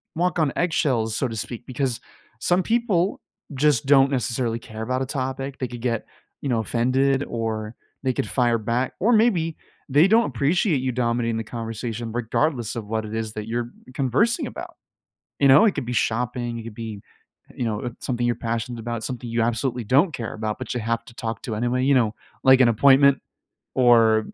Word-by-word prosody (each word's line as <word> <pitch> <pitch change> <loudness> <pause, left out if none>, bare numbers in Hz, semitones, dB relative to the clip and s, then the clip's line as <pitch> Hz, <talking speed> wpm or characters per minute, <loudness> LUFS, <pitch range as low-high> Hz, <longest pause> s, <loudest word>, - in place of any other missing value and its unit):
walk 175 +2 0
on 155 -4 +1
eggshells, 130 -10 +1
so 130 - 0
to 115 - -6
speak, 120 +2 -6
because 130 -2 -2 0.4
some 175 +9 +2
people 215 -5 0 0.3
just 135 -3 +2
don't 135 -1 +5
necessarily 120 -2 -1
care 110 -1 -8
about 130 +2 -1
a - - 0
topic, 135 0 -3
they 130 - -2
could 120 0 -8
get, 115 -2 -1 0.4
you 140 - -3
know, 115 -2 +1
offended 130 +5 +1
or 110 -1 -3 0.3
they 130 -1 +1
could 110 - -2
fire 120 -3 +2
back, 120 +4 -1
or 220 +6 +3
maybe, 195 -9 +2 0.3
they 150 +7 +6
don't 225 +3 +4
appreciate 145 - +1
you 130 0 -1
dominating 115 -2 0
the 115 - -2
conversation 115 0 -5
regardless 120 +1 -1
of 115 -3 -4
what 110 +1 -2
it 110 +1 -6
is 110 -1 -3
that 105 0 -6
you're 120 +1 -3 0.2
conversing 145 - +1
about, - - -8 0.7
you 140 - +5
know? 135 +11 +8
It 215 - +3
could - - -3
be 125 - -4
shopping, 120 0 -1
it 115 - -6
could 115 -2 -9
be, 110 -3 -7 0.5
uh, - - -16
you 125 - -2
know, 115 +2 -2
something 120 -2 -2
you're 120 0 +1
passionate 115 +1 -3
about, 115 0 -4
something 120 +1 -5
you 115 0 0
absolutely 120 +1 -1
don't 140 - +3
care 115 -2 -4
about, 110 -1 -3
but - - -5
you 125 - -2
have 115 +1 -2
to - - -14
talk 115 -2 -5
to 110 - -4
anyway, 120 +3 0
you 140 +1 +4
know? 115 -3 +2 0.3
Like 130 0 +7
an 125 - +6
appointment 135 +4 +5 0.6
or 115 -3 +5
120 Hz, 195 wpm, -23 LUFS, 115-135 Hz, 0.7 s, know